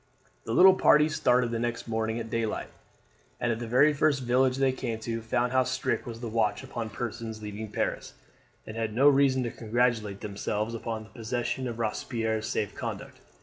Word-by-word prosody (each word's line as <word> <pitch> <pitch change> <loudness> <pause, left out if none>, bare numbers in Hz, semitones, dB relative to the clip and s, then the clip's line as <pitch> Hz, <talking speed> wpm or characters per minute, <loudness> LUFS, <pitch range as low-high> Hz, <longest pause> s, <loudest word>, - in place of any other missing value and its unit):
The - - -3
little 190 +8 +8
party 150 -4 +5
started 125 -5 +2
the 115 - -1
next 120 0 -3
morning 110 0 -1
at 115 -1 -6
day 115 -1 0
light, - - -4 0.7
and 120 - 0
at 115 - -2
the 120 - -5
very 135 +6 +5
first 145 -2 +2
village 125 +1 +2
they 135 -1 +3
came 120 -3 -3
to, 115 0 -3
found 120 +2 0
how 130 0 +4
strict - - -2
was 115 0 -7
the 120 - -4
watch 110 -2 0
upon 115 -2 -5
persons 110 -1 -5
leaving 105 +1 -6
Paris, - - -3 0.5
and 110 - -8
had 110 -1 -3
reason 135 -1 +5
to 120 - -3
congratulate 115 -3 0
themselves 105 +1 -3
upon 115 -1 -4
the 110 - -16
possession 120 +2 -3
of 115 -2 -5
Robespierre's 110 -1 -2
safe 105 -2 -2
conduct. - - -6
115 Hz, 190 wpm, -28 LUFS, 110-125 Hz, 0.7 s, little